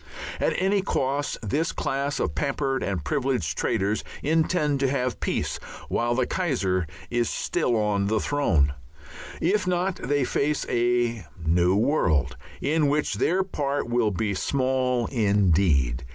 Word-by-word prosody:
At -, -, +1 dB
any 195 Hz, +2 st, +2 dB
cost 140 Hz, -5 st, -1 dB
this 155 Hz, +11 st, 0 dB
class 140 Hz, +1 st, -2 dB
of 75 Hz, -, -1 dB
pampered 135 Hz, -, -1 dB
and 90 Hz, -7 st, -2 dB
privileged 125 Hz, -, 0 dB
traitors 100 Hz, +3 st, 0 dB, 0.2 s
intend 155 Hz, -2 st, +1 dB
to 135 Hz, -1 st, +2 dB
have 125 Hz, -3 st, -1 dB
peace -, -, -1 dB, 0.3 s
while 120 Hz, 0 st, 0 dB
the 125 Hz, 0 st, +2 dB
Kaiser 100 Hz, -, 0 dB, 0.2 s
is 120 Hz, -2 st, +1 dB
still 120 Hz, -, 0 dB
on 105 Hz, -2 st, +1 dB
his 110 Hz, 0 st, 0 dB
throne. 85 Hz, -, +2 dB, 0.7 s
If 190 Hz, +3 st, +1 dB
not 180 Hz, +1 st, 0 dB
they 145 Hz, +1 st, 0 dB
face 145 Hz, +3 st, 0 dB
a 120 Hz, -5 st, 0 dB, 0.2 s
new 90 Hz, +3 st, +3 dB
world 85 Hz, -, +2 dB, 0.3 s
in 150 Hz, +1 st, +2 dB
which 150 Hz, +1 st, +1 dB
their 185 Hz, +3 st, +1 dB
part 145 Hz, -8 st, -2 dB
will 120 Hz, -2 st, +2 dB
be 100 Hz, +1 st, -1 dB
small 130 Hz, +2 st, 0 dB
indeed. 90 Hz, -, +2 dB
125 Hz, 140 wpm, -25 LUFS, 100-145 Hz, 0.7 s, new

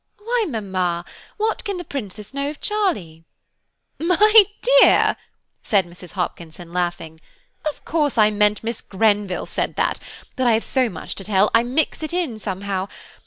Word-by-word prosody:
"Why, 460 Hz, +2 st, -1 dB
mamma, 185 Hz, -, -2 dB, 0.3 s
what 440 Hz, +1 st, -1 dB
can 400 Hz, -2 st, -3 dB
the 355 Hz, -, -5 dB
Princess 210 Hz, -, -7 dB
know 280 Hz, +1 st, -2 dB
of 295 Hz, -, -8 dB
Charlie?" 310 Hz, -, -1 dB, 0.8 s
"My 410 Hz, +6 st, +6 dB, 0.3 s
dear," -, -, +5 dB, 0.5 s
said 200 Hz, -4 st, +2 dB
Mrs. 175 Hz, 0 st, -14 dB
Hopkinson, 170 Hz, -2 st, -5 dB
laughing, 175 Hz, -3 st, -3 dB, 0.5 s
"of 295 Hz, -, -11 dB
course 295 Hz, -5 st, 0 dB
I 215 Hz, -1 st, +5 dB
meant 210 Hz, 0 st, +2 dB
Miss 230 Hz, +1 st, -3 dB
Grenville 205 Hz, -2 st, 0 dB
said -, -, -3 dB
that, -, -, 0 dB, 0.4 s
but 260 Hz, -2 st, +1 dB
I 235 Hz, -, +5 dB
have 220 Hz, -, +1 dB
so 255 Hz, -3 st, +1 dB
much 175 Hz, -, -7 dB
to 195 Hz, -, -8 dB
tell, 205 Hz, 0 st, +2 dB
I 230 Hz, -, +6 dB
mix 260 Hz, +8 st, -1 dB
it 315 Hz, +2 st, -3 dB
all 305 Hz, -12 st, -2 dB
somehow. 195 Hz, -1 st, -3 dB
215 Hz, 160 wpm, -21 LUFS, 185-305 Hz, 0.8 s, My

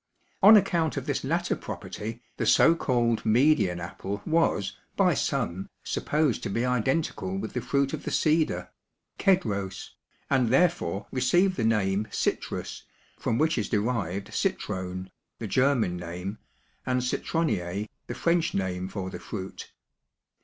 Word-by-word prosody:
On 210 Hz, +2 st, +10 dB
account 170 Hz, -5 st, +1 dB
of -, -, -3 dB
this -, -, -1 dB
latter -, -, 0 dB
property 115 Hz, +3 st, -7 dB
the -, -, -1 dB
so 165 Hz, -, +6 dB
called 120 Hz, -7 st, +1 dB
Median 115 Hz, -, +3 dB
apple 95 Hz, +4 st, -5 dB
was, 160 Hz, -, +1 dB, 0.2 s
by -, -, +4 dB
some, 95 Hz, +3 st, -2 dB
supposed 150 Hz, -5 st, 0 dB
to -, -, -3 dB
be 115 Hz, +5 st, 0 dB
identical 125 Hz, -, 0 dB
with 110 Hz, +3 st, -5 dB
the 125 Hz, -, -2 dB
fruit 140 Hz, +3 st, 0 dB
of 155 Hz, -, -4 dB
the -, -, -3 dB
cedar 155 Hz, 0 st, +1 dB, 0.5 s
(Kedros) 100 Hz, -, 0 dB, 0.4 s
and 130 Hz, -4 st, +2 dB
therefore 135 Hz, -, +2 dB
received 175 Hz, +9 st, +3 dB
the 120 Hz, -, -1 dB
name 105 Hz, -2 st, +1 dB
"Citrus" -, -, -2 dB, 0.4 s
from 115 Hz, -, 0 dB
which 155 Hz, -1 st, +2 dB
is 105 Hz, -, -2 dB
derived 100 Hz, -4 st, -1 dB
"citrone," 95 Hz, 0 st, -3 dB, 0.3 s
the 115 Hz, -, -5 dB
German 120 Hz, -5 st, +2 dB
name, 90 Hz, +4 st, -6 dB, 0.4 s
and 125 Hz, -1 st, 0 dB
"citronnier," 105 Hz, -, -1 dB, 0.2 s
the -, -, -5 dB
French 170 Hz, 0 st, +1 dB
name 95 Hz, -1 st, -1 dB
for 95 Hz, -1 st, -5 dB
the -, -, -6 dB
fruit. 95 Hz, -3 st, -7 dB
115 Hz, 140 wpm, -27 LUFS, 95-150 Hz, 0.5 s, On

